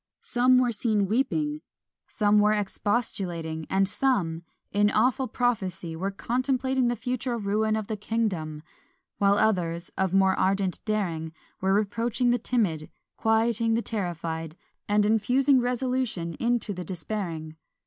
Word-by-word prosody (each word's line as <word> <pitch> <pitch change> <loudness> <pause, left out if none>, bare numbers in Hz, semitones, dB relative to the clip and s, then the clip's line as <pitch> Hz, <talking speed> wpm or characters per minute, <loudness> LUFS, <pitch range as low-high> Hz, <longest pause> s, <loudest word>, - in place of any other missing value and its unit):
Some 250 +1 +4
were 250 -1 +3
seen 215 -2 +1
weeping, 295 +7 0 0.5
some 210 -1 +3
were 210 +1 +4
expostulating, 190 -6 -2
and 195 0 +2
some, 195 -9 0 0.3
in 205 +1 +3
awful 250 +5 +2
prophecy, 190 -9 -1
were 190 +4 -2
contemplating 255 +4 0
the 240 - +1
future 245 +1 -2
ruin 215 +1 0
of 220 -1 -2
the 215 - -3
kingdom; 190 -9 -2 0.6
while 200 0 +4
others, 175 -6 0
of 190 -2 +1
more 190 0 +4
ardent 190 -1 0
daring, 170 -7 -2 0.3
were 190 +1 +2
reproaching 230 +4 +1
the 245 - +2
timid, 175 -11 -1 0.3
quieting 225 0 +2
the 230 - 0
terrified, 165 -5 -4 0.3
and 205 0 +3
infusing 250 +6 +3
resolution 245 -8 -1
into 235 -3 0
the 180 -1 -5
despairing. 165 -3 -4
210 Hz, 130 wpm, -26 LUFS, 185-240 Hz, 0.6 s, Some